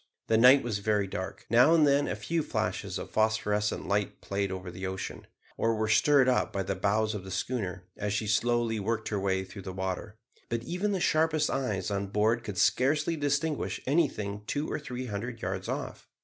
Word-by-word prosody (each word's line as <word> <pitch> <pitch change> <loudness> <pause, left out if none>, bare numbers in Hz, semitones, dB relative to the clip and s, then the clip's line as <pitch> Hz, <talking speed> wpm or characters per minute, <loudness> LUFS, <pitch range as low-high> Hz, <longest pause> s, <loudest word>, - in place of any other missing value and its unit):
The 110 - +4
night 130 +3 +7
was 110 -4 -2
very 105 0 +1
dark, 95 0 -6
now 125 +8 +6
and 155 -2 +5
then 140 0 +3
a - - -2
few 165 -1 -1
flashes - - -2
of - - -7
phosphorescent 105 -1 0
light 100 +1 -1
played 100 -1 -2
over 90 -1 -5
the 95 +2 -5
ocean, 95 0 -6 0.3
or 115 0 +1
were 110 0 0
stirred 135 +4 +5
up 125 - +2
by 95 - -2
the 100 - -2
bows 105 +3 +1
of 105 -3 -5
the 95 - -9
schooner, 95 -3 -3
as 105 0 -3
she 105 +1 -1
slowly 115 +1 +1
worked 110 +2 -2
her 105 - -1
way 95 -1 0
through 95 +1 -10
the 95 0 -6
water; 95 +3 -4 0.3
but 115 0 -2
even 180 +10 -1
the 195 - 0
sharpest 155 -2 +2
eyes 105 -8 -1
on 100 0 -1
board 110 +4 +1
could 105 -5 -6
scarcely 145 - +2
distinguish 145 +1 -1
anything 130 -9 0
two 145 +4 -1
or - - -2
three 130 -3 -5
hundred 115 +2 -5
yards 95 -1 -4
off. - - -5
110 Hz, 200 wpm, -29 LUFS, 100-130 Hz, 0.3 s, night